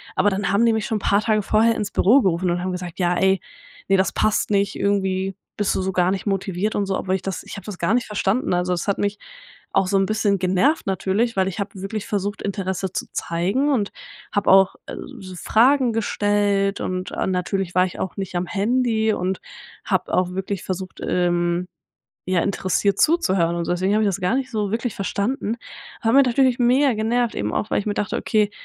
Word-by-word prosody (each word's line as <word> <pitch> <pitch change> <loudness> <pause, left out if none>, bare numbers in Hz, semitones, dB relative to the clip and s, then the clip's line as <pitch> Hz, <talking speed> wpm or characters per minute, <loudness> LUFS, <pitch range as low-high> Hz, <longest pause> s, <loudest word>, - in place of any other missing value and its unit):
Aber 190 +2 +3
dann 195 -1 -1
haben 205 +4 +3
die 230 - +4
mich 220 -1 -1
schon 220 - 0
paar 200 +1 +2
Tage 215 -2 +1
vorher 225 +3 +3
ins 210 -1 -3
Büro 250 +8 +5
gerufen 180 -1 +1
und 175 0 -1
haben 185 - -2
gesagt: 180 -1 -6
„Ja 175 -1 +2
ey, 190 0 +2 0.5
ne, 195 - +5
das 190 - +1
passt 215 - +1
nicht, 200 0 +1
irgendwie 190 -1 0 0.2
bist 205 -2 0
du - - 0
so 190 - -1
gar 180 -1 +2
nicht 195 -1 -3
motiviert“ 195 +1 -1
und 205 - 0
so, 195 - 0
obwohl 190 0 -1
ich 190 - -3
das 195 -2 -4
ich - - -9
habe 195 - -10
das 205 -4 -7
gar 170 +6 +1
nicht 245 0 +1
verstanden. 210 +1 0
Also 180 +1 0
das 175 - -3
hat 200 - +1
mich 205 0 -1 0.5
auch 190 - +2
so 195 - +2
'n 195 - +3
bisschen 205 -2 +1
genervt 190 - +1
natürlich, 200 +5 0
weil 190 - +2
ich 190 - -7
habe 200 - -2
wirklich 205 +1 -4
versucht, 205 0 -2
Interesse 190 -2 -3
zu - - -3
zeigen 195 +13 0
und 215 -7 0 0.4
habe 205 - +1
auch, 190 0 +5
äh, - - -6
s - - -7 0.2
so 185 -2 -9
Fragen 245 - +3
gestellt 205 -2 +1
und, 185 0 -3
äh, - - -2
natürlich 185 0 -2
war 185 0 +5
ich 180 - -7
auch 190 - -3
nicht 190 -2 -5
am 175 0 -1
Handy 220 +2 +1
und 185 0 -2 0.4
habe - - -1
auch 180 0 +2
wirklich 190 0 -4
versucht, 185 0 -5
ähm, 175 0 0 0.6
ja, 180 -2 +2
interessiert 200 0 0
zuzuhören 190 - +2
und 170 - -3
deswegen 185 +3 +1
habe 215 0 +3
ich - - +3
das 195 0 -2
gar 180 +7 +1
nicht 260 -1 -2
so 210 -4 -1
wirklich 230 0 -2
verstanden. 210 +4 -2 0.5
Hat 225 0 +2
mich 275 -1 +6
natürlich 255 0 +3
mega 255 +3 +4
genervt, 230 +2 0
eben 105 +1 -2
auch, 215 - -2
weil - - +2
ich 205 - -8
mir 205 - 0
dachte: 205 - -2
„Okay, 210 -2 +1
195 Hz, 220 wpm, -22 LUFS, 185-215 Hz, 0.6 s, mich